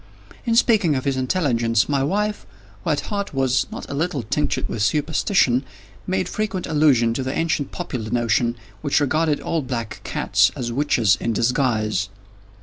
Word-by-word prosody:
In 230 Hz, -, +2 dB
speaking 215 Hz, -, +4 dB
of 130 Hz, -, -2 dB
his 140 Hz, -1 st, +1 dB
intelligence, 125 Hz, -, +1 dB
my 140 Hz, -2 st, +1 dB
wife, 210 Hz, +7 st, -1 dB, 0.4 s
who -, -, -2 dB
at 150 Hz, -, +1 dB
heart 200 Hz, -6 st, -3 dB
was 135 Hz, -1 st, +1 dB
not -, -, -7 dB
a -, -, -6 dB
little 150 Hz, -3 st, -1 dB
tinctured 145 Hz, +6 st, -1 dB
with 115 Hz, -, -4 dB
superstition, 145 Hz, -, +2 dB, 0.4 s
made 185 Hz, -1 st, 0 dB
frequent 195 Hz, -2 st, -2 dB
allusion 140 Hz, -7 st, +3 dB
to 130 Hz, -, -2 dB
the 130 Hz, +1 st, -3 dB
ancient 160 Hz, -4 st, -1 dB
popular 110 Hz, -4 st, -5 dB
notion, 120 Hz, 0 st, +1 dB, 0.3 s
which 145 Hz, -1 st, +2 dB
regarded 155 Hz, +1 st, +1 dB
all 165 Hz, -, -1 dB
black 120 Hz, -4 st, -5 dB
cats -, -, +2 dB
as 120 Hz, -1 st, -3 dB
witches 120 Hz, -5 st, +2 dB
in 115 Hz, -, 0 dB
disguise. 110 Hz, -4 st, +1 dB
135 Hz, 160 wpm, -22 LUFS, 120-160 Hz, 0.4 s, speaking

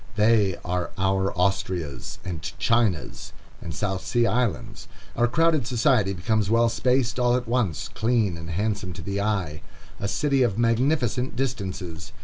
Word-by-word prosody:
They 105 Hz, -4 st, +3 dB
are 90 Hz, 0 st, -1 dB
our 95 Hz, 0 st, +1 dB
Austrias, 90 Hz, -5 st, -2 dB
and 85 Hz, -4 st, -4 dB, 0.2 s
Chinas, 115 Hz, -9 st, 0 dB, 0.3 s
and 85 Hz, -, -6 dB
South 95 Hz, +5 st, -2 dB
Sea 120 Hz, -1 st, +1 dB
Islands. 120 Hz, -8 st, -1 dB, 0.3 s
Our 120 Hz, -, +3 dB
crowded 155 Hz, -1 st, +2 dB
society 125 Hz, -6 st, +2 dB
becomes 100 Hz, +3 st, 0 dB
well 115 Hz, +1 st, +4 dB
spaced 125 Hz, +1 st, +1 dB
all 125 Hz, 0 st, +3 dB
at 125 Hz, -2 st, -2 dB
once, 115 Hz, -10 st, 0 dB
clean 110 Hz, -5 st, 0 dB
and 85 Hz, 0 st, -8 dB
handsome 100 Hz, +1 st, -2 dB
to -, -, -8 dB
the 100 Hz, 0 st, -2 dB
eye, 95 Hz, -8 st, -1 dB, 0.4 s
a 100 Hz, -, -2 dB
city 140 Hz, +3 st, +1 dB
of 115 Hz, -5 st, +2 dB
magnificent 125 Hz, +2 st, +1 dB
distances. 90 Hz, -10 st, -4 dB
110 Hz, 145 wpm, -25 LUFS, 95-120 Hz, 0.4 s, well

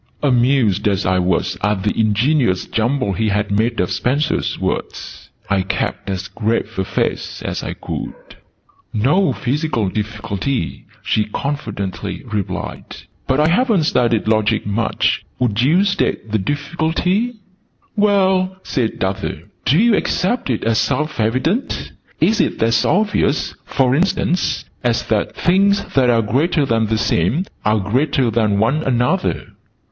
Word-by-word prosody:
Amused 120 Hz, -6 st, +3 dB
as 100 Hz, -2 st, 0 dB
I 95 Hz, 0 st, +2 dB
was 90 Hz, -1 st, 0 dB
at 105 Hz, -1 st, 0 dB
the 105 Hz, -, +1 dB
ingenious 110 Hz, -1 st, +2 dB
jumble 120 Hz, -1 st, 0 dB
he 110 Hz, +2 st, 0 dB
had 105 Hz, 0 st, 0 dB
made 115 Hz, +3 st, +1 dB
of 90 Hz, -, 0 dB
Spencer's 145 Hz, +5 st, 0 dB
words, -, -, -4 dB, 0.2 s
I 100 Hz, -1 st, +1 dB
kept 95 Hz, -, -3 dB
as 95 Hz, +1 st, -3 dB
grave 110 Hz, -1 st, -2 dB
a -, -, +2 dB
face -, -, -2 dB
as -, -, -3 dB
I -, -, -4 dB
could. -, -, -6 dB, 0.8 s
"No 150 Hz, -, +2 dB
physical 130 Hz, -, -1 dB
difficulty," 105 Hz, +4 st, -3 dB, 0.2 s
she 105 Hz, -, +1 dB
confidently 100 Hz, -, -4 dB
replied: 105 Hz, -5 st, -4 dB, 0.4 s
"but 130 Hz, -, +2 dB
I 155 Hz, +1 st, +4 dB
haven't 205 Hz, -1 st, +3 dB
studied 120 Hz, -7 st, +1 dB
Logic 110 Hz, 0 st, +2 dB
much. 105 Hz, +3 st, 0 dB
Would 115 Hz, -3 st, 0 dB
you 160 Hz, +9 st, +4 dB
state 195 Hz, -, -1 dB
the 110 Hz, -, +1 dB
difficulty?" 165 Hz, -, -1 dB, 0.6 s
"Well," 190 Hz, -3 st, +2 dB
said 120 Hz, -8 st, -2 dB
Arthur, 95 Hz, 0 st, -3 dB, 0.2 s
"do 145 Hz, -, +4 dB
you 225 Hz, +2 st, +5 dB
accept 195 Hz, -, 0 dB
it 115 Hz, -, -1 dB
as 115 Hz, 0 st, +2 dB
self 150 Hz, +1 st, -1 dB
evident? 130 Hz, -, 0 dB, 0.3 s
Is 220 Hz, -, +3 dB
it -, -, -1 dB
as 115 Hz, 0 st, +3 dB
obvious, 205 Hz, -7 st, +1 dB
for 130 Hz, -2 st, +1 dB
instance, 180 Hz, +2 st, 0 dB, 0.2 s
as 120 Hz, -2 st, +1 dB
that 110 Hz, -2 st, 0 dB
'things 200 Hz, +3 st, +2 dB
that 130 Hz, -2 st, +3 dB
are 115 Hz, -1 st, +3 dB
greater 145 Hz, +8 st, +1 dB
than 115 Hz, -3 st, +1 dB
the 110 Hz, +1 st, 0 dB
same 110 Hz, -, +1 dB, 0.2 s
are 105 Hz, +1 st, +2 dB
greater 125 Hz, +4 st, +1 dB
than 110 Hz, -3 st, +1 dB
one 115 Hz, +9 st, +2 dB
another'?" 130 Hz, +7 st, 0 dB
120 Hz, 140 wpm, -19 LUFS, 105-155 Hz, 0.8 s, you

